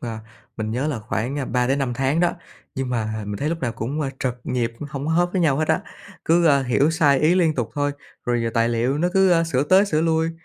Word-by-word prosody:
ờ, 115 -3 -5 0.4
mình 110 -1 -3
nhớ 130 +6 -1
là 140 -7 -2
khoảng, 110 +6 -3
a, 135 - -2
3-5 125 +1 0
tháng 135 +5 0
đó, 175 - +2 0.4
nhưng 130 -1 -3
mà 110 -2 -2
mình 105 0 -4
thấy 150 - -2
lúc 165 0 -3
nào 120 -3 -1
cũng, 125 +7 -4
ơ, 140 -3 -1
trật 125 -2 -1
nhịp, 120 -2 -1 0.2
hổng 140 0 -5
có 160 - 0
hớp 175 +1 +2
với 185 - 0
nhau 145 -5 +3
hết 155 +1 -1
á. 160 +3 +2 0.4
Cứ, 170 +1 +3
ơ, 140 -3 +4
hiểu 135 +5 +2
sai 150 -5 +3
ý 160 +4 +3
liên 165 -4 +2
tục 115 -3 -2
thôi, 145 0 0 0.3
rồi 120 -2 0
tài 115 0 +2
liệu 120 +5 0
nó 175 +2 +1
cứ, 190 -1 +4
ơ, 165 -1 +4
sửa 140 -5 0
tới 190 +7 +4
sửa 155 -5 0
lui 160 0 +1
140 Hz, 255 wpm, -22 LUFS, 120-160 Hz, 0.4 s, ơ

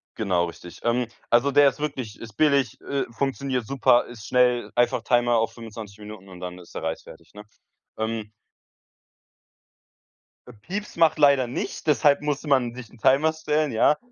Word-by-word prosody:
genau, 95 -6 +1
richtig. 85 0 -10
Ähm, 120 +1 +1 0.2
also, 120 +4 +3
der 145 0 +6
ist 135 - -12
wirklich 130 -8 -4
ist 115 -2 -10
billig, 140 -5 +2
äh, 140 0 -2
funktioniert 130 -1 -2
super, 130 -3 +3
ist 115 -3 -11
schnell, 125 -1 +2
einfach 120 -1 +1
Timer 120 0 +2
auf 110 0 0
25 110 -3 -10
Minuten 105 -2 -11
und 90 -1 -12
dann 90 0 -6
ist 90 -1 -15
der - - -5
Reis 80 0 -3
fertig, - - -15
ne? 105 - -10 0.6
Ähm 110 -1 -3 2.2
Äh, 125 - -12
Pieps 195 - -7
macht 165 -2 +3
leider 140 -3 +5
nicht, 125 - -5
deshalb 140 0 +4
musste 150 0 -3
man 130 -4 +2
sich 125 -2 -10
'n - - -18
Timer 140 +7 +3
stellen, 155 -2 -1
ja. 115 +6 +3
120 Hz, 170 wpm, -24 LUFS, 110-140 Hz, 2.2 s, der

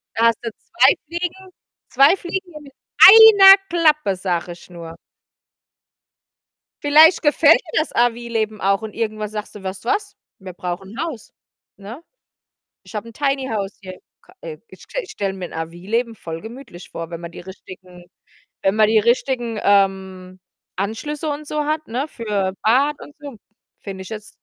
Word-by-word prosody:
Da 230 - +2
hast 230 -2 +1
du 230 - -3
2 255 +4 +2
Fliegen, 355 +3 -6 0.4
2 275 +7 +4
Fliegen 370 0 -6
nur 300 -2 -11
mit 280 -2 -16 0.3
1 405 -2 +10
Klappe, 305 - +1
sage 180 -2 -3
ich 175 - -13
nur. 165 -2 -10 1.9
Vielleicht 310 +4 +6
gefällt 300 +1 +5
dir 330 - -3
das 310 - -3
RV-Leben 230 -2 -1
auch 195 +1 0
und 220 -1 -8
irgendwann 215 -2 -4
sagst 215 0 -7
du: 205 - -11
„Weißt 190 0 -7
du - - -2
was? 410 0 -2 0.2
Wir 190 -1 -9
brauchen 180 +1 -7
‘n 245 +7 -6
Haus!" 315 -10 -7 0.5
Ne? 220 +10 -11 0.8
Ich - - -16
habe 215 +1 -6
‘n 230 - -12
Tiny 275 -2 -1
House 200 -2 -4
hier 185 -2 -10 0.2
ka - - -22
äh, - - -8
ich - - -16 0.2
ich 415 - -14
stelle 195 -1 -4
mir 190 -2 -7
‘n - - -11
RV-Leben 185 +9 -4
voll 165 -6 -8
gemütlich 225 -6 -12
vor, 165 -1 -7
wenn 170 -1 -7
man 170 0 -8
die - - -11
richtigen 185 -1 -13 0.6
wenn 195 - +1
man 215 0 +4
die 220 0 +3
richtigen, 235 -1 -1
ähm, 190 -2 0 0.4
Anschlüsse 250 - -4
und 295 +1 -5
so 300 0 -3
hat, 310 +1 -2
ne, 255 +6 -3
für 205 -7 -3
Bad 270 +7 +2
und 290 - -13
so, 285 -4 -10 0.4
finde 195 -2 -8
ich 190 - -9
jetzt 215 -1 -8
225 Hz, 170 wpm, -19 LUFS, 190-295 Hz, 1.9 s, 1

